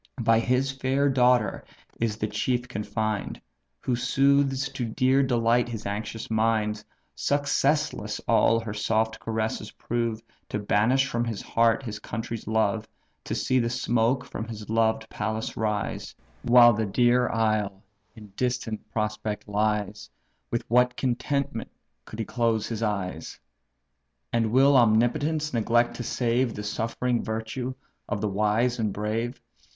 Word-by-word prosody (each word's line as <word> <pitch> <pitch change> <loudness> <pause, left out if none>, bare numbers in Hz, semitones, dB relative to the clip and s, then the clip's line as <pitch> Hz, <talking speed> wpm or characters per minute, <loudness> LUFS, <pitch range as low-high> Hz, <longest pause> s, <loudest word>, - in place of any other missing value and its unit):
By 115 0 +4
his 125 +3 +1
fair 135 +2 +1
daughter 125 -5 +3 0.4
is 110 -2 -1
the 110 - -1
chief 125 +4 -1
confined, 105 -1 -3 0.4
Who 125 - 0
soothes 135 +2 +2
to 135 -2 -4
dear 130 +4 +2
delight 120 -2 +2
his 110 -2 -6
anxious 105 +2 -4
mind; 110 -1 +1 0.3
Successless 145 +1 0
all 115 - +4
her 110 -2 -5
soft 110 +1 0
caresses 110 -1 -3
prove, 115 -2 -2 0.3
To - - -2
banish 110 +6 +2
from 120 -3 -1
his 115 -3 -4
breast 115 +2 +2
his 105 -3 -5
country's 115 +1 -5
love; 110 0 +1 0.4
To - - -3
see 130 - +1
the 115 -1 0
smoke 120 +2 +1
from 110 -3 -6
his 110 -2 -7
loved 110 0 +1
palace 110 +1 -3
rise, 105 -2 -2 0.3
While 120 +2 +7
the 110 0 -1
dear 120 +4 +3
isle 110 -3 0 0.3
in 105 -2 -12
distant 125 -3 -3
prospect 105 -1 -3
lies, 105 0 -1 0.4
With 120 - -2
what 125 +1 +3
contentment 130 -1 -1 0.4
could 110 - -9
he 115 - -2
close 115 -2 0
his 115 -1 -4
eyes! 100 -6 -3 0.9
And 115 -2 +1
will 135 +3 +5
Omnipotence 130 +7 +2
neglect 120 +1 +2
to 120 - -4
save 120 0 0
The 105 - -5
suffering 115 +3 -1
virtue 115 +4 -4 0.3
of 105 - -1
the 105 0 -1
wise 110 +5 +1
and 110 -2 0
brave? 110 +5 -3
115 Hz, 140 wpm, -26 LUFS, 110-125 Hz, 0.9 s, While